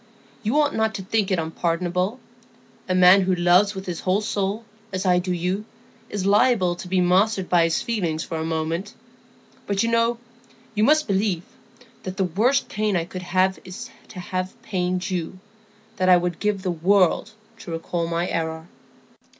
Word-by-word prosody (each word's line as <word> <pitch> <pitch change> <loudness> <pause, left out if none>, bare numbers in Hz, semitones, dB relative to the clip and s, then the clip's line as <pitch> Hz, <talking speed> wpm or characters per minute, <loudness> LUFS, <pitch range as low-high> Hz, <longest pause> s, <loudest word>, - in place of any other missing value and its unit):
You 230 +7 +1
ought 295 -1 +2
not 220 0 0
to 190 - -5
think 210 +1 0
it 190 - +1
unpardonable; 175 +6 -1 0.7
a 185 - +2
man 185 +2 +7
who 185 0 +1
loves 180 +4 +4
with 190 0 -6
his 175 -3 -4
whole 190 +3 +1
soul, 205 +1 -2 0.3
as 190 +1 -3
I 180 -1 +4
do 180 +1 -3
you, 180 +3 -1 0.5
is 200 -2 -3
liable 200 -3 +3
to 180 - -8
be 185 +1 +1
mastered 190 +2 +2
by 170 -2 +4
his 165 - 0
feelings 175 -9 -1
for 165 - -5
a - - -2
moment; 165 +5 -3 0.7
but 200 +1 +1
you 230 - 0
know—you 230 -1 -2
must 305 +5 +4
believe—that 200 +2 -4
the 195 - +2
worst 225 +10 +1
pain 210 -2 -1
I 170 -2 0
could 185 +1 -7
have 185 +1 +1
is 230 +6 -9 0.2
to 185 - -10
have 185 +4 -4
pained 185 -1 -2
you; 180 0 -3 0.6
that 185 -2 +2
I 180 - +8
would 175 -1 -2
give 210 -2 -1
the 185 - 0
world 185 +5 +2 0.3
to - - -10
recall 165 +1 -2
the 170 +1 -2
error." 160 0 -3
185 Hz, 175 wpm, -23 LUFS, 175-210 Hz, 0.7 s, I